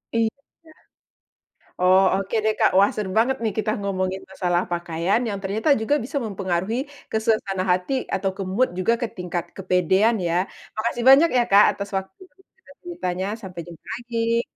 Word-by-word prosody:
Iya. 225 -1 +2 1.5
Oh, 185 +1 +5 0.2
oke 195 +3 -4
deh 220 - +3
Kak, - - +5
wah 200 - +5
seru 210 -3 -3
banget 260 +3 +2
nih, 220 - 0
kita 215 0 0
ngomongin 190 -1 -2
masalah 180 -2 0
pakaian, 175 +5 0
yang 200 - -3
ternyata 215 +9 -1
juga 220 +6 +1
bisa 280 +4 -3
mempengaruhi 195 +2 -2 0.3
ke - - 0
suasana 195 -4 0
hati 180 +8 -1 0.2
atau 190 0 0
ke 195 - -4
mood 255 +5 +3
juga, 205 +5 +2
ke - - +2
tingkat 180 -1 -3
kepedean, 190 +4 +2
ya? 165 - 0 0.4
Makasih 235 +2 -2
banyak 290 +5 +7
ya, 240 - +5
Kak, 200 +1 +8
atas 200 0 -6
waktu 190 - -6
dan 380 - -29 0.2
juga 470 -12 -19
ceritanya, 185 - -3 0.2
sampai 180 -2 -7
jumpa 170 -2 -13
lagi. 230 -1 -1
200 Hz, 170 wpm, -23 LUFS, 185-230 Hz, 1.5 s, Kak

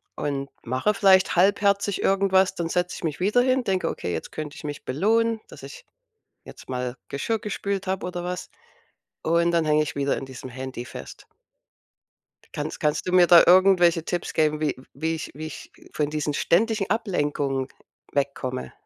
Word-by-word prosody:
und 140 -1 -3
mache 130 - 0
vielleicht 190 -2 +4
halbherzig 200 +2 +2
irgendwas. 195 -1 +3
Dann 170 -2 -3
setze 180 +1 -1
ich - - -11
mich 155 -3 -2
wieder 210 +7 +3
hin, 255 0 +2
denke: 190 -3 0
„Okay, 90 - -4
jetzt 80 - -5
könnte 150 -1 -6
ich - - -10
mich 145 -1 -6
belohnen, 225 - +1
dass - - -13
ich - - -10 0.6
jetzt - - -13
mal 125 -1 -3
Geschirr 225 +11 -2
gespült 200 -1 -3
habe“ 190 0 -2
oder 175 -1 -5
was. 180 0 -5 0.7
Und 170 +1 +2
dann 170 -2 +2
hänge 155 0 +3
ich 150 - -6
wieder 140 0 0
in 135 - -5
diesem 130 0 -9
Handy 130 -1 -6
fest. - - -10 1.3
Kannst - - -4
kannst 150 0 0
du 180 - -2
mir 180 -1 +6
da 175 -1 +9
irgendwelche 180 -3 +5
Tipps 175 0 -3
geben, 155 -1 +1
wie 155 -2 0 0.2
wie 160 +4 -2
ich 160 - -6
wie 155 +2 -6
ich 155 - -9 0.2
von 150 -1 -1
diesen 150 -1 -2
ständigen 210 +5 +1
Ablenkungen 145 - -1 0.4
wegkomme? 130 - -2
170 Hz, 170 wpm, -24 LUFS, 145-195 Hz, 1.3 s, da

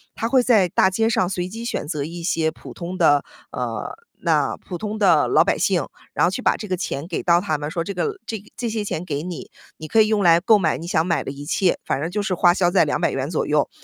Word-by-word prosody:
他 225 - -2
会 255 +1 +4
在 220 -7 +4
大 190 - +3
街 225 +4 +1
上 185 -5 +1
随 180 -1 -2
机 225 +5 -7
选 235 - -3
择 150 -3 -2
一 170 +2 -7
些 165 -3 +1
普 - - -11
通 180 +2 -6
的， 145 -4 +4 0.3
呃， - - -4 0.3
那 - - +1
普 180 - -7
通 215 +3 -4
的 200 - +4
老 - - +4
百 - - 0
姓， - - +1 0.3
然 - - +1
后 - - +3
去 - - -4
把 - - +3
这 210 - -7
个 185 - 0
钱 155 -5 -4
给 175 - -3
到 175 0 +4
他 155 -6 -1
们， 145 +1 -4
说 170 -1 -2
这 200 - -5
个 415 - -2
这 220 -3 -4
这 235 -2 -3
些 215 -1 -3
钱 170 -3 -3
给 150 -3 -4
你， 180 -2 -7 0.3
你 155 - -8
可 220 - +5
以 215 - +4
用 215 -2 +1
来 170 -1 +6
购 210 +4 +4
买 160 -4 +1
你 165 - -8
想 165 -1 +1
买 170 -2 0
的 - - -5
一 145 +1 -9
切。 180 +3 +1
反 - - -1
正 160 +4 -2
就 205 +3 -2
是 200 -2 -1
花 175 0 +4
销 175 -2 +1
在 165 - +4
¥200 135 -1 -1
左 165 - -1
右， 150 -1 +1
180 Hz, 280 characters per minute, -22 LUFS, 160-205 Hz, 0.3 s, 来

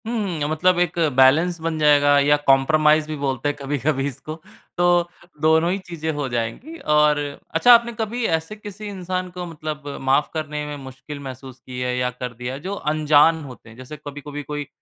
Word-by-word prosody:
हुँ, 205 -8 -2
मतलब 175 +3 +2
एक 175 0 0 0.2
बैलेंस 155 +7 +4
बन 165 -1 -2
जाएगा 145 -1 +5
या 145 +1 +4
कंप्रोमाइज़ 150 +3 +4
भी 155 - -4
बोलते 140 -1 -2
हैं 145 - -3
कभी-कभी 140 0 -1
इसको, 150 +3 -7 0.4
तो 175 -1 +3 0.3
दोनों 160 +2 +3
ही 190 - 0
चीज़ें 170 -4 -6
हो 145 -2 -3
जाएँगी। 120 - -4
और 150 0 +3 0.4
अच्छा, 240 +9 +7
आपने 235 0 +4
कभी 225 +2 -2
ऐसे 160 +6 -9
किसी 210 0 -10
इंसान 185 -1 -4
को 180 0 -6
मतलब 155 -2 -6 0.2
माफ 135 +2 +2
करने 150 -2 -4
में 150 0 -5
मुश्किल 135 +3 -9
महसूस 130 -1 -9
की 125 +1 -9
है 125 0 -1
या 125 0 0
कर 125 0 -6
दिया 125 +2 -6
है 135 - -6
जो 185 +6 -5 0.2
अनजान 155 +1 +4
होते 125 -4 -12
हैं? 115 - -14
जैसे 130 +4 -9
कभी-कभी 145 0 -7
कोई 145 0 -5
150 Hz, 185 wpm, -22 LUFS, 135-175 Hz, 0.4 s, अच्छा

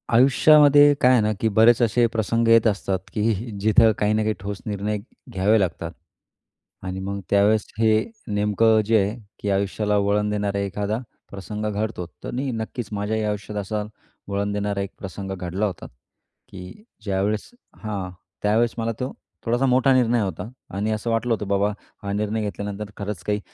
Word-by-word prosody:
आयुष्यामध्ये 145 +3 +6
काय 125 - +6
आहे 125 -4 +5
ना, 105 +1 +1
की 115 - +1
बरेच 110 +3 +5
असे 120 +1 +3
प्रसंग 115 0 0
येत 115 0 +6
असतात, 100 -2 0
की 110 +2 +1 0.3
जीथे 110 +1 +5
काही 105 +1 +2
ना 110 - +1
काही 110 - +1
ठोस 100 +1 -5
निर्णय 105 0 -2 0.3
घ्यावे 105 +2 +3
लागतात. 85 -3 -2 0.9
आणि 95 0 -4
मग 100 +1 -4
त्यावेळेस 105 +2 +3
हे 110 - +4 0.4
नेमकं 105 +2 +3
जे 110 +1 +4
आहे, 105 +4 -2 0.2
की 105 - -3
आयुष्याला 100 +2 0
वळण 100 +1 +1
देणारा 100 -1 -1
एखादा 100 +2 -2 0.3
प्रसंग 100 +2 -5
घडतो. 105 -3 -3 0.2
तर - - -5
नी-नक्कीच 120 -3 -4
माझ्याही 105 +1 -1
आयुष्यात 105 0 -3
असा 105 +2 -3 0.4
वळण 100 +1 -1
देणारा 100 -1 -1
एक 100 - -5
प्रसंग 95 0 -6
घडला 90 +3 -2
होता. 95 -5 -5 0.6
की 95 - -11 0.2
ज्यावेळेस 100 +1 -1 0.3
हा, 100 -4 -3 0.3
त्यावेळेस 115 +3 +2
मला 115 0 -1
तो 125 - -3 0.3
थोडासा 120 +4 +1
मोठा 130 +1 +4
निर्णय 120 -2 +3
होता 95 0 -4 0.3
आणि 105 +2 -1
असं 110 +2 -2
वाटलं 115 +1 +1
होतं 105 -2 -3
बाबा 100 +1 +2 0.3
हा 100 - -3
निर्णय 105 +1 -1
घेतल्यानंतर 105 0 -5
खरंच 100 -3 -5
काही 105 0 -1
105 Hz, 165 wpm, -23 LUFS, 100-115 Hz, 0.9 s, आयुष्यामध्ये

